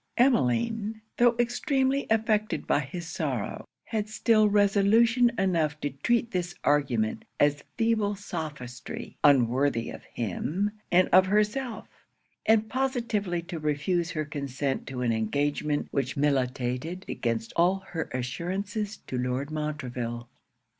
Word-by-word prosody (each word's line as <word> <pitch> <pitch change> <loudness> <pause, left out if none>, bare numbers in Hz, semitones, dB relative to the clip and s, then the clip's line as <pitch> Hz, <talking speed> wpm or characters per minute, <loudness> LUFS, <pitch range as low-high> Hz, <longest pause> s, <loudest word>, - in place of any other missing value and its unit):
Emmeline, 225 - +2 0.2
tho' 240 0 +5
extremely 265 +3 +1
affected 215 -1 +1
by - - +2
his 160 +5 -5
sorrow, 145 -8 -3 0.2
had 215 -2 -3
still 215 -1 +3
resolution 215 +4 +4
enough 165 -6 +1
to 145 - -2
treat 235 - 0
this 175 -1 -2
argument 130 -7 +1 0.2
as 145 0 +3
feeble 225 -3 +1
sophistry, 150 -10 -6
unworthy 130 -2 +3
of - - -9
him 155 - -2 0.2
and 180 +1 +5
of 185 +1 +6
herself; 215 +4 0 0.6
and 220 0 +4
positively 230 -8 -1
to 170 -1 -6
refuse 155 +3 0
her 155 -3 -2
consent 140 -2 -3
to 130 -2 -4
an 120 - +2
engagement 145 +6 0
which 135 -1 -1
militated 135 +4 -1
against 115 -1 -2
all 180 +3 +3
her 165 -2 -3
assurances 190 - -3
to 125 - -5
Lord 125 +4 -2
Montreville. 125 -6 -4
170 Hz, 120 wpm, -27 LUFS, 135-215 Hz, 0.6 s, of